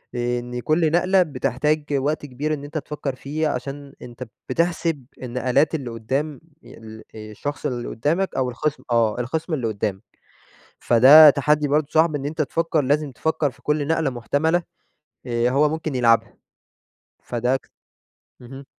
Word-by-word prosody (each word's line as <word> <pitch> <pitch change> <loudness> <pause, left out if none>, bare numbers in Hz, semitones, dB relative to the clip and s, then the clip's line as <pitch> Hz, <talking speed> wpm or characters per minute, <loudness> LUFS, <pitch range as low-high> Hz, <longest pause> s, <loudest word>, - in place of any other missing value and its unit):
إن 120 0 -2
كل 155 +4 +1
نقلة 185 +3 +3
بتحتاج 150 +1 -1
وقت 145 +2 -1
كبير 145 +3 -3
إن 145 -1 -5
أنت 150 +2 -6
تفكّر 145 -3 -4
فيه 155 +4 -2
عشان 140 +1 -5
أنت 120 +1 -9 0.3
بتحسب 165 -4 -1 0.2
النقلات 125 +5 +1
اللي 135 -6 -4
قدّام 135 +6 -3 0.2
ي - - -14 0.4
الشخص 110 +8 -6
اللي 125 -4 -3
قدّامك 165 +11 -1
أو 130 -1 0
الخِصْم 150 +5 -3
آه، 115 -1 +2
الخِصْم 160 +7 -3
اللي 125 -6 -1
قدّامك. 100 -2 -3 0.8
فده 140 +6 +8
تحدّي 150 +1 +1
برضه 150 +1 +1
صعب 160 0 +3
إن 140 0 -4
أنت 155 +1 -2
تفكّر 165 +2 0
لازم 145 +1 0
تفكّر 150 +4 -1
في 130 - -23
كل 150 -1 0
نقلة 160 -4 +1
محتملة 150 +8 0 0.6
آآ، 120 0 +1
هو 145 +3 +3
ممكن 160 -1 -4
يلعبها، 115 -2 +2 0.9
فده 125 +2 0
ك - - -15 0.7
اهم. 135 +3 -11
140 Hz, 145 wpm, -22 LUFS, 125-155 Hz, 0.9 s, فده